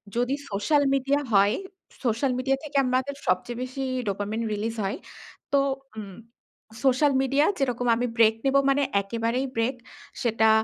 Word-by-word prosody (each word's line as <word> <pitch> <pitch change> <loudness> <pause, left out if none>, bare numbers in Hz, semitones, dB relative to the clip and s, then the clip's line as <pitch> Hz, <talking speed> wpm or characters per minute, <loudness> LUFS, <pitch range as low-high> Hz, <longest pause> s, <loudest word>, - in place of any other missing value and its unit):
যদি 245 +3 +1 0.2
social 245 +9 +2
media 275 +2 +1
হয় 200 +2 +5 0.5
social 240 +3 +1
media 270 +1 +1
থেকে 295 -2 -3
আমাদের 260 +2 0
সবচেয়ে 210 +7 0
বেশি 255 +2 -6 0.3
ডোপামিন 205 +3 -2
রিলিজ 220 +2 -3
হয়। 195 - -2 0.6
তো 280 - +5 0.4
উম 200 -3 -7 0.7
সোশ্যাল 275 +2 +4
মিডিয়া 275 +3 +2
যেরকম 245 -2 0
আমি 245 +2 -1
ব্রেক 225 -1 +5
নেব 270 0 +2
মানে 280 +1 +3 0.2
একেবারেই 230 +5 -1
ব্রেক। 230 +3 0 0.5
সেটা 225 -2 +3
245 Hz, 140 wpm, -26 LUFS, 220-270 Hz, 0.7 s, হয়